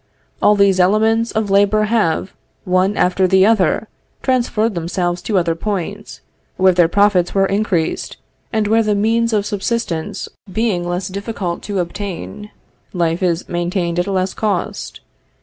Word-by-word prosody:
All 210 - +5
these 200 -2 +3
elements 220 +5 +3
of 215 -3 -1
labor 205 +2 +3
have, 210 -5 0 0.3
one 185 +2 +1
after 185 +1 +2
the 190 +1 +4
other, 220 0 +2 0.4
transferred 235 -4 +1
themselves 175 +1 -2
to 200 +2 -1
other 170 -2 +1
points, 205 +3 -5 0.4
where 185 0 +4
their 175 -1 +4
profits 200 -1 +2
were 195 0 +4
increased, 195 -4 -1 0.3
and 220 -2 0
where 225 +2 +3
the 215 -2 +1
means 230 +3 +1
of 210 -2 +1
subsistence 205 -5 -3 0.2
being 185 -5 -1
less 180 +2 -2
difficult 195 -2 -4
to 200 - -2
obtain, 200 +3 -5 0.4
life 170 -1 0
is 175 -2 0
maintained 175 0 -1
at 175 - 0
a - - -2
less 185 0 0
cost. 205 -5 -3
195 Hz, 150 wpm, -18 LUFS, 180-215 Hz, 0.4 s, All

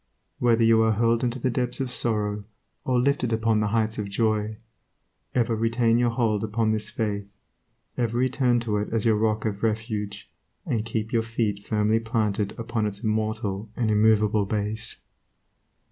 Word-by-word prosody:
Whether 120 -2 +3
you 115 0 +5
are 110 0 +3
hurled 115 +2 +2
into 120 0 0
the 130 0 0
depths 125 +2 -2
of 130 -2 -2
sorrow 105 -4 -1 0.4
or 125 -1 +2
lifted 130 -2 +1
upon 110 -1 +2
the 105 - +1
heights 110 0 0
of 100 -1 -3
joy, 110 0 0 0.8
ever 120 -2 +2
retain 115 +1 +2
your 120 -1 +3
hold 115 -3 0
upon 110 +1 0
this 105 -1 -2
faith, 105 -2 -2 0.7
ever 120 -1 0
return 125 -1 +2
to 110 -3 -1
it 105 - -3
as 115 -1 0
your 110 -2 +4
rock 110 0 0
of 100 -2 -2
refuge, 110 -2 -2 0.4
and 110 -2 -1
keep 110 0 -3
your 115 - +3
feet 110 -3 -2
firmly 110 +1 +1
planted 110 -3 -1
upon 115 -2 -1
its 100 +2 -7
immortal 110 -1 -1
and 115 -3 0
immovable 105 -1 +3
base. 110 +2 -3
110 Hz, 165 wpm, -25 LUFS, 105-115 Hz, 0.8 s, you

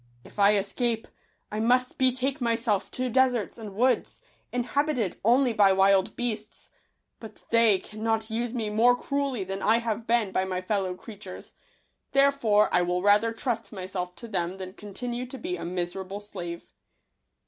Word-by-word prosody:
If - - -13
I 200 +1 +6
escape, 225 +3 -1 0.4
I 210 - -3
must 250 +3 +2
betake 260 +2 +1
myself 230 -4 0
to 255 0 -2
deserts 250 -3 +1
and 210 -3 -8
woods, 250 +4 +1 0.3
inhabited 250 - 0
only 245 +3 +4
by 205 -2 +5
wild 195 +1 +3
beasts; 220 -3 -5 0.5
but 220 -2 -12
they 230 -3 +5
cannot 220 +2 -3
use 235 +1 -2
me 225 -4 -3
more 235 +3 +5
cruelly 275 -5 -2
than 195 +1 -5
I 220 +3 +4
have 230 -1 -3
been 230 -4 +2
by 190 - +1
my 185 -1 -2
fellow 185 -1 -1
creatures, 195 -1 -11 0.6
therefore 275 -7 +4
I 180 - +5
will 180 +1 -1
rather 205 +3 +4
trust 230 -2 -3
myself 185 -2 -5
to 235 - -10
them 185 -3 -2
than 185 -1 -7
continue 240 +5 -5
to 265 - -8
be 355 +6 -3
a - - -6
miserable 185 +3 -4
slave." 175 -5 -7
220 Hz, 160 wpm, -27 LUFS, 195-245 Hz, 0.6 s, I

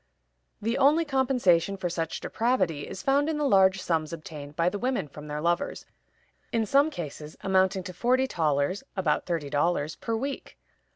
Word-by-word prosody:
The 230 +2 0
only 305 +4 +4
compensation 245 - +2
for 185 - -2
such 165 -2 -3
depravity 185 - 0
is - - -7
found 280 +3 +2
in 315 - -1
the 295 -1 +1
large 190 -4 +5
sums 165 -3 -1
obtained 150 -3 -8
by 165 +2 +1
the 200 +3 -1
women 250 - -1
from 150 +1 -11
their 150 0 -4
lovers, 170 +1 -1 0.7
in 225 -1 +1
some 280 +7 +4
cases 155 - -7
amounting 190 0 +2
to 185 -1 -7
forty 250 +7 +2
thalers 155 - 0
(about 160 -6 0
thirty 160 -5 -2
dollars) 150 0 0
per 230 - -3
week. 275 +5 -5
185 Hz, 170 wpm, -27 LUFS, 160-250 Hz, 0.7 s, large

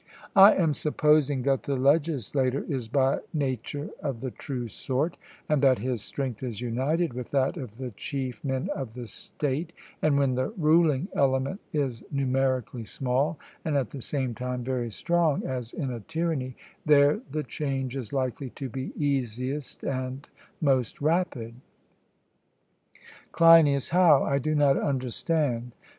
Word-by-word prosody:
I 195 +1 +9
am 165 -5 +2
supposing 150 -2 +2
that 135 0 +2
the 140 - -2
legislator 140 -2 +1
is 130 -7 -3
by 135 +2 +2 0.2
nature 145 +1 -2
of 135 -5 -3
the 130 - -3
true 125 -2 -5
sort, 135 +8 -2 0.3
and 150 -3 +2
that 130 -3 +5
his 120 0 -2
strength 130 -1 -4
is 120 -5 -4
united 130 +7 0
with 125 0 -6
that 135 -1 +1
of 125 -9 -8
the 130 -1 -5
chief 130 +2 -5
men 135 +6 -2
of 130 - -6
the 125 -1 -6
state; 145 - -4 0.3
and 150 -2 +3
when 135 -2 +2
the 130 +1 0
ruling 155 -1 +3
element 135 +7 +1
is 130 -7 -2
numerically 130 -3 0
small, 135 +7 -1 0.3
and 150 -3 0
at 130 -5 -1
the 140 - -7
same 130 -2 -2
time 125 +1 -4
very 125 -2 -2
strong, 170 - +1
as 125 -3 -4
in 135 -6 -3
a 120 - -4
tyranny, 155 -1 -2 0.3
there 145 +3 +5
the 155 -1 -2
change 135 -4 -3
is 125 -6 -5
likely 130 0 -2
to 135 +2 -6
be 130 +2 -5
easiest 135 -1 -2
and 130 +1 -3 0.3
most 130 -6 +1
rapid. 150 -7 0 1.8
CLEINIAS: 165 -5 +6
How? 175 -4 +5
I 140 0 +1
do 155 +3 -1
not 145 -2 +4
understand. 130 -2 -1
135 Hz, 150 wpm, -27 LUFS, 125-150 Hz, 1.8 s, I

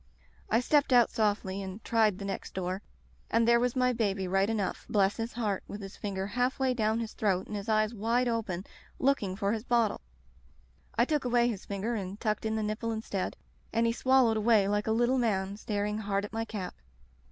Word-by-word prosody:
I 225 +3 +3
stepped 290 +2 +3
out 245 -2 +6
softly 205 -3 0
and 190 +2 -7
tried 220 -4 +2
the 200 - -6
next 195 - -5
door, 185 +1 -2 0.5
and 230 0 +3
there 235 0 +6
was 245 +1 0
my 250 -1 +3
baby 200 -5 0
right 195 +2 +2
enough, 210 -4 -2
bless 200 -1 +2
his 225 +1 -3
heart, 210 -5 -1
with 205 - -7
his 195 -1 -8
finger 195 -2 -3
half 245 +5 0
way 265 -2 +1
down 220 -1 +1
his 225 -1 -5
throat 190 -3 0
and 210 - -6
his 200 +1 -5
eyes 215 +1 +2
wide 230 +3 +1
open, 210 -6 -2 0.3
looking 255 -9 +1
for 200 0 0
his 220 -1 -3
bottle. 235 -4 +1 0.9
I 235 - +4
took 300 0 0
away 240 -1 +3
his 205 -5 -5
finger 200 +4 -2
and 200 -2 -4
tucked 215 -1 -1
in 220 - -1
the 220 - -1
nipple 215 +2 -2
instead, 220 -4 -3 0.3
and 230 +1 +2
he 230 - +2
swallowed 255 -3 +3
away 215 -2 +4
like 205 +1 0
a - - +2
little 240 +3 +2
man, 200 -4 0
staring 210 0 -2
hard 200 -1 -1
at 205 - -11
my 225 0 -1
cap. 195 -5 -5
215 Hz, 210 wpm, -30 LUFS, 200-235 Hz, 0.9 s, out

